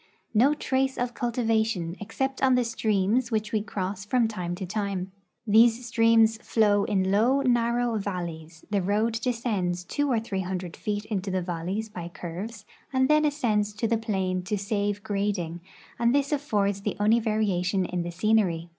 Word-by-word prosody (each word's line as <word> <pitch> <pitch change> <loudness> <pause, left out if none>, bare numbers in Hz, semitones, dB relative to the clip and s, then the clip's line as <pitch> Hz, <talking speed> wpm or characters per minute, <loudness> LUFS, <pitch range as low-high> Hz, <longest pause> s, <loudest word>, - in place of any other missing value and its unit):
No 260 +7 +4
trace 265 -2 0
of 245 0 -2
cul 240 0 -2
tivation, 220 -7 0
except 265 +6 -3
on 260 -1 +4
the 250 - +3
streams 225 +1 +1
which 215 -2 -1
we 215 - +1
cross 195 -2 -4
from 235 +2 +2
time 180 -5 -4
to 190 +1 -5
time. 195 -1 -3 0.3
These 230 +3 +5
streams 225 -1 +4
flow 210 -3 +2
in 190 -2 +1
low, 240 +7 +3
narrow 240 -2 +1
valleys; 170 -5 -6
the 200 -2 +2
road 215 +4 0
descends 210 -8 -1
two 290 +10 -1
or 235 - +2
three 200 -4 -3
hundred 180 -2 -4
feet 210 0 -3
into 200 -3 -3
the 185 -1 -1
valleys 180 +5 -3
by 180 -5 -7
curves, 190 +6 -7 0.3
and 260 0 +2
then 305 0 +4
ascends 215 -8 0
to 225 +2 -1
the 230 - +2
plain 190 -5 -1
to 210 +2 -1
save 205 0 -2
grading, 195 -5 -2 0.4
and 235 +2 +3
this 280 0 +1
affords 205 -9 0
the 210 +1 -3
only 215 +3 +4
variation 195 -4 0
in 180 -1 -2
tlie 175 - -4
scenery." 185 -3 +1
210 Hz, 170 wpm, -26 LUFS, 190-230 Hz, 0.4 s, These